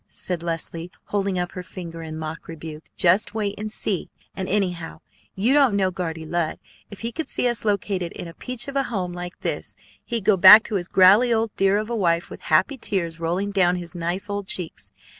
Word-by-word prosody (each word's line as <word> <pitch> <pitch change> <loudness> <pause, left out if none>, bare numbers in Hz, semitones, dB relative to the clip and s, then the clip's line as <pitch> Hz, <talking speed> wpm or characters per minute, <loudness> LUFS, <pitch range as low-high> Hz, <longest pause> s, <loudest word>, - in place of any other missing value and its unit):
said 180 -3 -5
Leslie, 165 0 -4
holding 200 -2 -1
up 180 0 -2
her 180 - -6
finger 170 -2 -8
in 160 -1 -6
mock 160 +1 -6
rebuke. 160 -1 -8
"Just 185 +5 +3
wait 205 -2 -1
and 215 0 -4
see! 200 -3 -2 0.3
And, 190 -1 -4
anyhow, 180 -5 -1 0.3
you 225 +8 +2
don't 275 -7 +4
know 190 -2 +2
Guardy 165 -3 -4
Lud. 170 0 -1 0.3
If 205 - -10
he 230 +1 -3
could 320 +6 -5
see - - 0
us 240 -2 -1
located 195 -4 -1
in - - -7
a 165 - -10
peach 250 +6 -1
of 275 - -6
a 275 -1 +1
home 185 -6 -2
like 175 0 -7
this, - - -3 0.3
he'd 230 -5 -3
go 200 -1 +5
back 205 +5 +10
to - - -7
his 175 -2 -4
growley 200 +6 +6
old 225 -2 0
dear 195 +1 +3
of 215 0 -2
a 235 - -2
wife 170 -5 +1
with - - -9
happy 190 - +3
tears 170 -7 -1
rolling 180 +5 -1
down 180 -3 +3
his 175 -1 -6
nice 175 +3 -3
old 205 -1 -4
cheeks. 180 -4 -5
185 Hz, 215 wpm, -23 LUFS, 170-210 Hz, 0.3 s, back